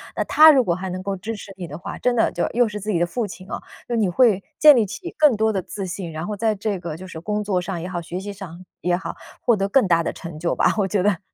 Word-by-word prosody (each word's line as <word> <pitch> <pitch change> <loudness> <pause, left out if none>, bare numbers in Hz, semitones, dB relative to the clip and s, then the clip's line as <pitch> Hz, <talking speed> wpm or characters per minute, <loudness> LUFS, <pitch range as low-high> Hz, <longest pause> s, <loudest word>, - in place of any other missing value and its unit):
那 - - 0
他 310 +1 +7
如 275 -4 +6
果 180 -6 +1
还 185 +2 -4
能 185 +1 -5
够 200 +1 -2
支 225 +5 -5
持 205 -1 -10
你 180 -2 -6
的 150 - -7
话， 175 - -7
真 250 -1 +1
的 225 - +2
就 - - -1
又 245 0 +3
是 210 0 -5
自 210 +2 -6
己 195 - +1
的 170 - +2
父 220 +5 -3
亲 185 0 -11
啊， - - -3 0.3
就 240 - -2
你 215 -3 +2
会 200 +1 +3 0.2
建 300 -1 +9
立 225 - +3
起 205 - -7
更 300 -6 +5
多 220 +1 +2
的 195 -3 -1
自 195 +2 -6
信， 180 -1 -5
然 160 +2 -4
后 210 +1 -4
在 220 +1 +1
这 200 -1 -2
个 170 -3 -5
就 180 +4 -9
是 185 -3 -8
工 210 +5 -2
作 200 -3 0
上 180 -2 -4
也 180 - -5
好， 180 -2 -3
学 170 +1 -6
习 205 +1 -6
上， 185 -3 -10 0.2
也 175 0 +1
好， 180 - -6 0.2
获 235 -3 +3
得 195 0 0
更 255 +3 +3
大 170 -1 +4
的 - - -2
成 170 -3 -9
就 170 +1 -1
吧， - - +3
我 200 -2 +2
觉 195 -1 0
得。 205 -2 +2
195 Hz, 330 characters per minute, -22 LUFS, 180-215 Hz, 0.3 s, 建